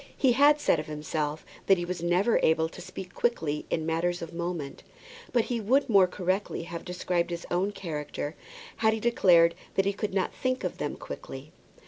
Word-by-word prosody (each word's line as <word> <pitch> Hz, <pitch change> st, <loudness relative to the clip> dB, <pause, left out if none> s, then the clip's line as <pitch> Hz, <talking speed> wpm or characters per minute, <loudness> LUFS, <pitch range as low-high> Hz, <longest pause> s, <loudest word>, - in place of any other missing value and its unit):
He 265 Hz, -, +4 dB
had 290 Hz, +4 st, +5 dB
said 170 Hz, -, +2 dB
of 155 Hz, -, -5 dB
himself 150 Hz, 0 st, -3 dB, 0.2 s
that 195 Hz, -, +6 dB
he 175 Hz, -, -2 dB
was 180 Hz, -1 st, -4 dB
never 180 Hz, +6 st, +2 dB
able 160 Hz, 0 st, +3 dB
to -, -, -11 dB
speak 185 Hz, 0 st, -8 dB
quickly 160 Hz, -11 st, -1 dB
in 160 Hz, -, -1 dB
matters 170 Hz, +2 st, 0 dB
of 165 Hz, -, -8 dB
moment; 170 Hz, -5 st, -4 dB, 0.5 s
but 240 Hz, -2 st, +3 dB
he 235 Hz, -1 st, -2 dB
would 265 Hz, +7 st, +3 dB
more 195 Hz, -4 st, +6 dB
correctly 185 Hz, 0 st, -2 dB
have 170 Hz, 0 st, -7 dB
described 180 Hz, -1 st, -1 dB
his 170 Hz, 0 st, -5 dB
own 185 Hz, +4 st, +1 dB
character 150 Hz, -5 st, -5 dB, 0.4 s
had 220 Hz, -1 st, +3 dB
he 220 Hz, -, -2 dB
declared 180 Hz, -8 st, +5 dB, 0.2 s
that 195 Hz, -, +2 dB
he 200 Hz, -, +1 dB
could 210 Hz, +1 st, -3 dB
not 190 Hz, -, 0 dB
think 255 Hz, 0 st, -2 dB
of -, -, -3 dB
them -, -, -2 dB
quickly. -, -, -8 dB
180 Hz, 190 wpm, -28 LUFS, 165-205 Hz, 0.5 s, that